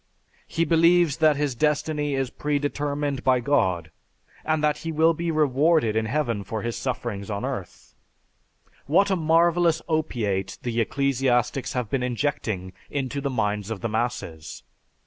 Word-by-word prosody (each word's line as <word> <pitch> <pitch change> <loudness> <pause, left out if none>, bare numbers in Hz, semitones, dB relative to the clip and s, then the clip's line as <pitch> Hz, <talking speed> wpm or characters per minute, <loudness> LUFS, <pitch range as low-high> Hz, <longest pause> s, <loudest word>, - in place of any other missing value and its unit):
He 165 +1 0
believes 165 -1 +4
that 155 -2 +4
his 145 -2 -1
destiny 150 +1 0
is 135 -2 -1
predetermined 145 -1 -2
by 130 -1 +4
God 95 - +1 0.5
and 155 -1 0
that 150 0 +2
he 165 - -4
will 160 +1 +4
be 170 +1 -3
rewarded 150 -4 +2
in 110 0 0
heaven 120 -5 -1
for 110 +2 -4
his 120 0 -2
sufferings 115 -6 -4
on 100 -1 -3
earth. - - -6 0.9
What 195 +7 +3
a - - +3
marvelous 165 0 +3
opiate 110 - -1
the 120 -1 0
ecclesiastics 130 0 0
have 125 -4 -3
been 135 - 0
injecting 120 -7 -2 0.2
into 140 0 -3
the 140 - -1
minds 105 -4 -1
of 110 -3 -5
the 115 - -2
masses! 110 -9 -4
140 Hz, 145 wpm, -25 LUFS, 115-155 Hz, 0.9 s, believes